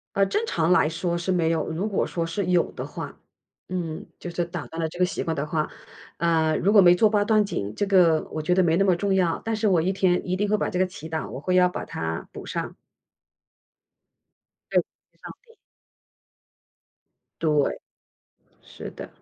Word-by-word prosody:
呃， 195 0 +4
正 420 - -1
常 165 - +1
来 160 -4 +4
说 170 +1 -2
是 175 +2 -2
没 165 -3 +2
有。 160 -2 0
如 175 +7 -2
果 200 - 0
说 170 -1 -2
是 180 +3 -2
有 180 -2 +2
的 - - -6
话 - - -7 0.5
嗯， 170 -3 -4
就 175 - -6
是 170 0 -2
打 170 -4 -6
断 165 +6 -6
了 160 - 0
这 170 - -10
个 180 - +3
习 180 - -4
惯 165 - -2
的 140 0 -2
话， 155 0 -1 0.5
呃， 160 -2 +2
如 200 +4 +2
果 210 - +7
没 175 -1 +7
做 215 +3 +4
八 205 -1 +2
段 215 -1 +4
锦， 105 - -4
这 205 - 0
个 180 -5 +4
我 155 - -3
觉 180 +3 +1
得 185 - +4
没 165 -1 +3
那 195 - +3
么 185 -3 +4
重 195 +3 0
要， 180 -3 +1
但 225 - -2
是 220 0 0
我 180 -5 +3
一 185 +4 +1
天 185 -2 +1
一 185 +1 -1
定 205 - 0
会 215 - +3
把 - - -1
这 180 - -2
个 185 - +3
祈 160 -3 -10
祷， 160 -1 -3
我 - - -6
会 180 +3 -1
要 180 0 +6
把 180 - -5
它 - - -5
补 - - -9
上。 - - -4 2.0
对， - - +4 0.4
上 - - -8
帝。 465 - -21 1.9
对， 150 -3 +1 0.8
是 - - -9
的。 - - -9
180 Hz, 220 characters per minute, -25 LUFS, 165-195 Hz, 2.0 s, 果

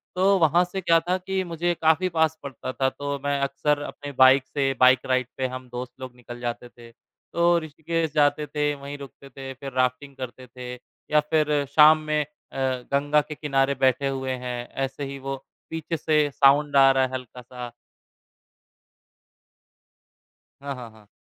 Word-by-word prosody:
तो 195 +2 +4
वहाँ 170 +2 +4
से 190 +2 -5
क्या 165 -1 +4
था 185 +1 +2
कि 190 +1 -2
मुझे 175 0 -1
काफ़ी 160 +4 +3
पास 160 -1 +1
पड़ता 130 -2 -6
था 135 - +1
तो 140 +1 -4
मैं 140 0 0
अक्सर 145 +2 0
अपने 145 0 -7
बाइक 130 +1 +7
से 135 -2 0
बाइक 130 0 +6
राइड 130 -1 +1
पे 130 - 0
हम 130 0 -8
दोस्त 125 0 -6
लोग 130 -1 -8
निकल 120 0 -10
जाते 120 0 -5
थे, 120 -1 -15
तो 170 +8 -1
ऋषिकेश 160 0 -3
जाते 150 0 +2
थे, 150 +1 0
वहीं 140 +1 -8
रुकते 140 0 -12
थे, 135 0 -8
फिर 135 +1 -8
राफ्टिंग 130 +2 -1
करते 130 0 -8
थे 125 0 -8 0.4
या 150 - +5
फिर 150 -2 +2
शाम 155 0 +8
में 150 0 +2
अ, 150 -1 -16
गंगा 140 +3 +1
के 150 +1 -8
किनारे 140 -2 +1
बैठे 130 +1 +2
हुए 135 -1 -2
हैं, 125 -1 -4
ऐसे 135 +1 -4
ही 140 0 -6
वो 135 +1 -4 0.3
पीछे 165 +1 -3
से 150 -1 +2
साउंड 140 +1 +4
आ 135 0 +8
रहा 135 0 +3
है 130 - -1
हल्का-सा। 125 -1 -8 2.9
हाँ, 140 0 -4
हाँ, 125 -2 -9
हाँ। 110 -2 -20
140 Hz, 175 wpm, -25 LUFS, 130-150 Hz, 2.9 s, शाम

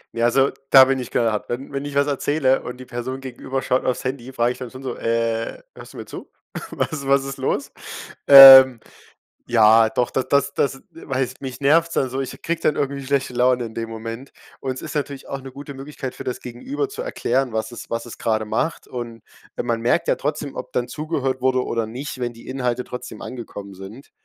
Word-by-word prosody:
Ne, 115 - -2
also, 135 +3 +3 0.2
da 130 -1 +9
bin 135 0 0
ich 125 - -6
knall 115 -2 +1
hart. 105 - -4
Wenn 125 +3 -5
wenn 140 +1 -3
ich 145 - -6
was 140 0 +3
erzähle 140 -1 +1
und 125 0 -7
die 130 - -10
Person 125 +2 -5
gegenüber 130 0 -5
schaut 130 - +1
aufs 125 - -1
Handy, 130 0 -4
frage 120 -1 +1
ich 125 - -8
dann 125 - -6
schon 130 +3 -11
so, 130 -2 -4
„Äh, 115 - -2
hörst - - -12
du - - -12
mir - - -7
zu? - - -10 0.4
Was 140 -4 -3
was 135 0 +3
ist 135 0 -6
los?“ 130 - -2 0.6
Ähm, 135 -3 +11 0.7
ja, 110 -1 +5
doch, 120 +2 -1
d - - 0
das 140 0 +2
das 140 - 0 0.2
das 165 - -13
weißt 130 -2 -2
mich 130 0 -7
nervt's 165 +4 +3
dann 130 -2 0
so, 135 - -3
ich 135 - -6
kriege 165 0 -2
dann 150 - +1
irgendwie 140 -1 -2
schlechte 135 -1 -1
Laune 125 0 +2
in 110 -1 -8
dem 115 0 -4
Moment 115 +3 -7 0.3
und 130 -1 -3
s - - -9
ist 160 - -7
natürlich 140 -2 -4
auch 135 - -5
'ne 135 0 -10
gute 140 +1 -9
Möglichkeit 135 -1 -7
für - - -9
das 125 - -4
Gegenüber 265 - -5
zu 430 +3 -7
erklären, 135 - -1
was 110 +2 -2
es 120 - -9
was 115 +1 -3
es 120 - -10
gerade 110 -1 0
macht 160 +9 -2
und 120 -3 -7 0.3
weil - - -3
man 115 -1 -1
merkt 120 +1 +1
ja - - +2
trotzdem, 145 -1 -4
ob - - -7
dann 125 0 0
zugehört 140 -4 -3
wurde 130 0 +1
oder 115 -1 -2
nicht, 130 +4 -7
wenn 120 -1 -3
die 115 - -15
Inhalte 125 -2 -2
trotzdem 125 0 -8
angekommen 105 -5 -8
sind. 95 +8 -11
130 Hz, 225 wpm, -22 LUFS, 120-140 Hz, 0.7 s, Ähm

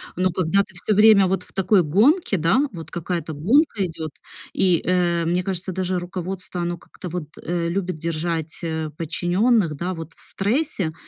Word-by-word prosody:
Но 185 0 +1
когда 185 +3 +2
ты 195 -2 -19
всё 195 +4 0
время 210 -2 +7
вот 185 0 -1
в - - -17
такой 190 -1 +3
гонке, 215 - +3
да, 200 - +2
вот 165 -2 -9
какая-то 170 -1 -3
гонка 215 - +2
идет, 160 -3 -6 0.4
и, 180 -3 +3
э, 175 -2 +1
мне 175 +2 +1
кажется, 190 0 -3
даже 185 0 -1
руководство, 180 0 -5
оно 175 0 -2
как-то 180 +2 -10
вот, 170 -3 -4
э, 170 0 -1
любит 185 -1 -2
держать, 165 0 -3
э, 160 -1 -2
подчиненных. 175 +3 +1
Да, 175 +5 -3
вот 165 -1 -8
в - - -16
стрессе, 205 - -1
180 Hz, 175 wpm, -22 LUFS, 165-195 Hz, 0.4 s, время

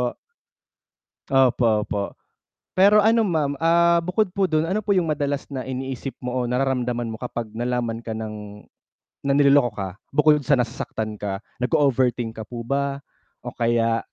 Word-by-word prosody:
Opo. 125 -1 -1 1.1
Opo, 120 -5 +3
opo 100 -1 -2 0.7
pero 200 +2 +5
ano 225 +1 +4
ma'am 155 -6 0
ah, 170 +1 +4
bukod 180 +3 0
po 195 -1 +1
dun 155 0 +1
ano 190 +5 0
po 200 -2 +1
yung 165 -4 +1
madalas 145 -1 -2
na 130 - -3
iniisip 130 0 -5
mo 125 - -2
o - - -5
nararamdaman 125 -2 -1
mo 110 - -6
kapag 120 -3 -5
nalaman 120 -1 -2
ka 110 -1 -5
ng 105 -2 -7 0.6
na 140 - +3
niloloko 140 -3 +5
ka 95 -2 -3 0.2
bukod 150 +1 +4
sa 140 0 +2
nasasaktan 110 -3 -3
ka 100 -1 -3 0.2
nag-o-overthink 125 -4 +1
ka 110 - -7
po 120 -1 -6
ba? 140 +2 -2 0.4
O - - -5
kaya 115 -1 +1
130 Hz, 155 wpm, -23 LUFS, 115-155 Hz, 1.1 s, pero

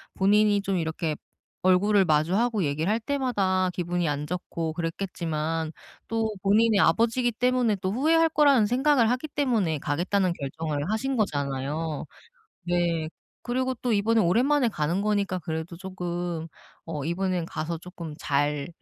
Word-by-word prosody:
본인이 205 +1 +3
좀 195 -1 -1
이렇게 160 -1 -2 0.5
얼굴을 195 +2 +4
마주하고 185 +8 +2
얘기를 155 +5 -1
할 225 - +1
때마다 205 -9 0
기분이 175 -1 -1
안 145 0 -2
좋고 170 -2 -3
그랬겠지만 165 -2 -3 0.4
또 225 -1 0
본인의 210 +1 +4
아버지이기 235 +6 +3
때문에 250 -2 +2
또 185 0 -2
후회할 325 +7 +3
거라는 280 -8 +4
생각을 250 0 +3
하기 255 +5 -2
때문에 225 - 0
가겠다는 180 +6 0
결정을 150 +2 -4
하신 265 +5 -1
거잖아요. 145 -3 -2 0.6
네. 170 -3 +1 0.3
그리고 255 +1 -1
또 240 -3 +1
이번에 220 +2 +2
오랜만에 245 +8 +3
가는 170 0 -1
거니까 200 -3 0
그래도 160 +1 -5
조금 175 -3 -4 0.4
어 150 -4 -5
'이번엔 180 -1 -1
가서 165 0 -4
쪼끔 170 -3 -8
잘 145 +2 0
185 Hz, 330 characters per minute, -26 LUFS, 160-225 Hz, 0.6 s, 얼굴을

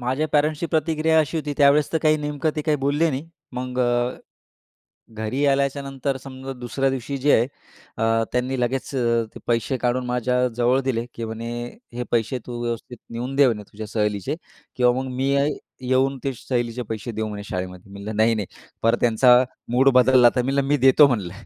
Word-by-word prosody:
माझ्या 130 +5 -1
पॅरेंट्सची 150 +2 +1
प्रतिक्रिया 160 0 +1
अशी 155 +1 +1
होती 150 -2 -2
त्यावेळेस, 145 0 +4
तर 160 - +2
काही 155 0 +4
नेमकं 150 +1 -2
ते 150 - -1
काही 155 -1 +1
बोलले 145 +4 +1
नाही. 145 +4 -5 0.2
मग 125 0 -4
अ, 120 0 +1 1.0
घरी 110 +6 -2
आल्याच्यानंतर 140 0 0
समजा 130 0 -8
दुसऱ्या 125 +3 -1
दिवशी 135 +1 -4
जे 145 +3 +3
आहे, 115 - +4 0.5
अ, 115 0 +2
त्यांनी 125 +1 -1
लगेच 130 +3 -2
अ, 115 -3 +1
ते - - -10
पैसे 120 +3 0
काढून 125 +1 0
माझ्याजवळ 125 +1 +1
दिले, 125 -3 -1
की 115 - -5
म्हणे 115 +1 -5 0.4
हे 125 - -3
पैसे 120 +2 0
तू 120 -1 -5
व्यवस्थित 120 +1 -4
नेऊन 125 +3 -4
दे 140 -1 +6
म्हणे 110 -4 0
तुझ्या 110 +1 -7
सहलीचे 105 - -1 0.4
किंवा 125 -1 +4
मग 130 - -6
मी 130 +2 0
येई 140 +1 +2 0.3
येऊन 135 +1 +2
ते 135 - 0
सहलीचे 120 0 -2
पैसे 110 +1 -4
देऊ 110 0 -3
म्हणे 105 -1 -6
शाळेमध्ये. 90 0 -6
मी 100 - -9
म्हटलं 105 +1 -5
नाही-नाही 110 -2 +2 0.4
परत 115 +1 +3
त्यांचा 125 +2 +5 0.3
मूड 130 +3 +5
बदलला 125 -1 +6
तर, 125 - +3
मी 135 +2 -1
म्हटलं, 140 0 +1
मी 145 - +3
देतो 135 +2 +6
म्हणलं. 105 -10 -1
125 Hz, 185 wpm, -23 LUFS, 115-140 Hz, 1.0 s, दे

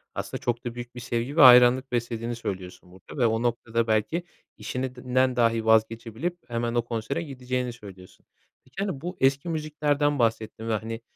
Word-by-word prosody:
aslında - - -5
çok 120 0 -2
da 120 -1 -4
büyük 120 0 -8
bir - - -6
sevgi 120 +5 -3
ve - - +6
hayranlık 125 0 +7
beslediğini 120 -1 -2
söylüyorsun 90 -5 -7
burada 95 +9 -13
ve - - +5
o 110 0 +1
noktada 115 -1 -1
belki 110 +11 0 0.3
işinden 130 0 -1
dahi 115 -2 +2
vazgeçebilip 115 +8 +1
hemen 115 0 -2
o 120 - +3
konsere 120 +7 -3
gideceğini 125 -4 -3
söylüyorsun. 95 -5 -14 0.4
Peki, 130 - -27
hani, 185 -10 -4
bu 180 +2 -6
eski 135 +5 +2
müziklerden 150 -2 0
bahsettin 115 -1 -1
ve, - - +1
hani, 115 +2 -4
120 Hz, 165 wpm, -26 LUFS, 115-130 Hz, 0.4 s, hayranlık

